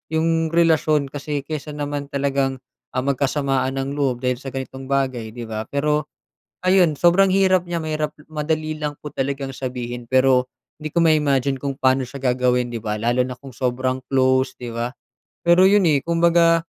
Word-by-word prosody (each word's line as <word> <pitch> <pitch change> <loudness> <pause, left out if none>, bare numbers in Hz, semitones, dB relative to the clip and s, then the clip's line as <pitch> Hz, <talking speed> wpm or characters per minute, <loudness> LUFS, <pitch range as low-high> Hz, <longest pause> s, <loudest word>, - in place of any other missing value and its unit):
'yong 165 0 +1
relasyon 155 -4 +2
kasi 145 0 -4
kaysa 150 0 -6
naman 145 -1 -4
talagang, 140 -1 0 0.4
ah, 130 - 0
magkasamaan 135 -1 0
ng 140 +2 -5
loob 130 -3 0
dahil 125 -1 0
sa 140 - -10
ganitong 130 0 -6
bagay, 130 -5 -1
'di 120 - -6
ba? 110 -1 -5
Pero 150 +1 0 0.6
ayan 185 -4 +4
sobrang 180 +4 +4
hirap 185 -1 +3
niya 170 - -1
mahirap 155 -1 -2 0.2
madali 155 0 -2
lang 150 -1 -2
po 150 - -6
talagang 135 0 -2
sabihin 125 -2 -5
pero 130 -1 +4 0.4
hindi 155 - -4
ko - - -4
ma-imagine 140 -4 +2
kung 140 -1 -3
pa'no 130 0 +3
siya 140 - -8
gagawin, 125 -1 +1
'di 115 - -4
ba, 105 -1 -2
lalo 120 +3 +1
na 125 0 -3
kung 135 0 -12
sobrang 130 +1 -1
close, 130 0 +2
'di 120 -2 -7
ba? 120 +1 -2 0.5
Pero 175 +2 +5
'yon 200 +1 +5
eh, 145 - +3
kumbaga 170 0 +4
140 Hz, 170 wpm, -21 LUFS, 130-155 Hz, 0.6 s, Pero